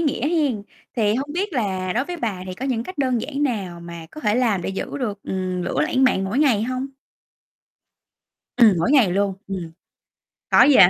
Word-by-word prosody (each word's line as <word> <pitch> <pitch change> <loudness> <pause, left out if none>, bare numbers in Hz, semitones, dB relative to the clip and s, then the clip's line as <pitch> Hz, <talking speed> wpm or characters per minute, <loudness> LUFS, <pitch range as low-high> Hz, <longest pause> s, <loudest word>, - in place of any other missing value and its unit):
nghĩa 295 -3 0
hen. 290 -11 +1 0.3
Thì 215 -2 +3
hông 280 +4 -2
biết 385 +3 -2
là 190 -7 -1
đối 245 +4 0
với 355 +3 -5
bà 220 - -2
thì 185 - -5
có 250 +8 -6
những 240 -4 -1
cách 370 +3 -9
đơn 255 -4 +1
giản 290 +2 -3
nào 195 -10 -2
mà 170 -1 -8
có 305 - -9
thể 210 -2 +2
làm 225 -7 +2
để - - -3
giữ 195 - -4
được, 210 -6 -3
ừm, 185 -1 -2
lửa - - -1
lãnh 260 +1 +2
mạn 195 -7 +3
mỗi 205 +8 -1
ngày 255 -9 +4
hông? 255 +3 -2 1.7
Ừm, 225 -6 +6
mỗi 170 - +1
ngày 240 -11 +5
luôn. 200 0 +1
Ừm. 180 -4 -5 0.8
Có - - +7
gì 290 - +6
là 190 - +10
225 Hz, 210 wpm, -22 LUFS, 190-270 Hz, 1.7 s, là